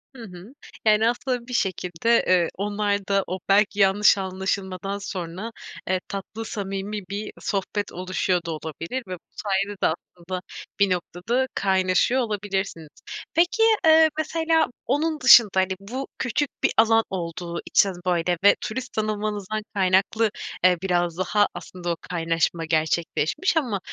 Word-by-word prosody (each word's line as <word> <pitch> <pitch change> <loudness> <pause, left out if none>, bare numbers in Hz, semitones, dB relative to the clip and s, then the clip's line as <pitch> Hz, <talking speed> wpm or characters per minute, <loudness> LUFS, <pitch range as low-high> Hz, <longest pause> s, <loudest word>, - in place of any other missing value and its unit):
Hı 240 - -9
hı. 190 +3 -11 0.3
Yani 215 +1 +4
aslında, 245 0 -3
bir 250 - -7
şekilde, 190 +2 +1
eee, 180 -2 +3
onlar 205 0 -1
da 195 -1 +2
o 185 +2 -4
belki 205 +1 +3
yanlış 205 +1 +5
anlaşılmadan 190 0 -3
sonra, 190 +2 -6 0.4
eee, 185 0 +1
tatlı 200 +3 -6
samimi 200 0 -4
bir 205 +2 -4
sohbet 205 +1 -2
oluşuyor 185 0 -1
da 165 - -3
olabilir 160 - -5
ve 185 - -5
bu - - -16 0.2
sayede 200 0 -2
de - - +4
aslında, 175 +2 -5 0.4
bir 200 -1 +4
noktada 185 +8 -1
kaynaşıyor 190 +6 +2
olabilirsiniz. 195 -7 -3 0.4
Peki, 350 +7 +3 0.2
eee, 320 0 +7
mesela 320 0 +1 0.2
onun 305 +4 0
dışında, 240 -4 +8
hani, 190 0 +2
bu 250 +7 -6
küçük 255 +3 0
bir - - +4
alan 225 0 +5
olduğu 170 -1 -4
için 200 - +3
böyle 175 -1 +1
ve 200 - +7
turist 245 +3 -5
sanılmanızdan 215 -1 -2
kaynaklı, 195 +3 +2 0.3
eee, 180 -1 +5
biraz 175 -3 0
daha 205 +3 +2
aslında 175 0 -7
o - - -1
kaynaşma 165 -1 0
gerçekleşmiş 160 - 0
ama 240 -10 0
195 Hz, 140 wpm, -24 LUFS, 180-225 Hz, 0.4 s, dışında